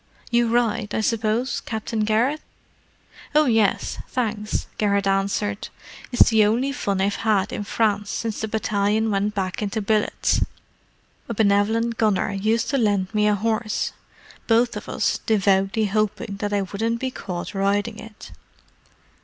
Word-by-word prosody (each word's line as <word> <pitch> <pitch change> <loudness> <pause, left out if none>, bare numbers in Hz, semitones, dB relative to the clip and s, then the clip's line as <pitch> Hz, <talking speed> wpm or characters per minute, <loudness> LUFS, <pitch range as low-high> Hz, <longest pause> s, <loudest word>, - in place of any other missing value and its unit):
You 235 0 +3
ride, 230 -2 0
I - - +1
suppose, 230 +3 0
Captain 220 0 -4
Garrett?" 225 +8 +1 0.9
"Oh, 305 0 +6
yes, 225 -5 +1
thanks," 215 -4 -2
Garrett 200 -1 +2
answered. 200 +1 0 0.4
"It's 245 - +5
the 220 -1 +5
only 235 +6 +1
fun 200 -8 -2
I've 200 +1 +1
had 210 -2 +1
in - - -3
France 205 -1 0
since 225 -2 -3
the 220 - -1
battalion 215 0 0
went 205 +1 0
back 190 0 -2
into 210 +1 -2
billets: 215 0 +1 0.9
a 230 - -3
benevolent 220 +3 +2
gunner 210 -1 +2
used 220 +5 0
to 275 - +1
lend 205 -3 +1
me 210 0 +3
a 210 - +3
horse—both 225 +2 -2
of - - -7
us - - 0
devoutly 200 0 +2
hoping 210 0 -1
that 205 0 -3
I 200 -1 +1
wouldn't 225 +5 -2
be 260 +1 -2
caught 180 -4 -6
riding 205 +3 0
it." 220 -1 -11
215 Hz, 145 wpm, -23 LUFS, 200-225 Hz, 0.9 s, Oh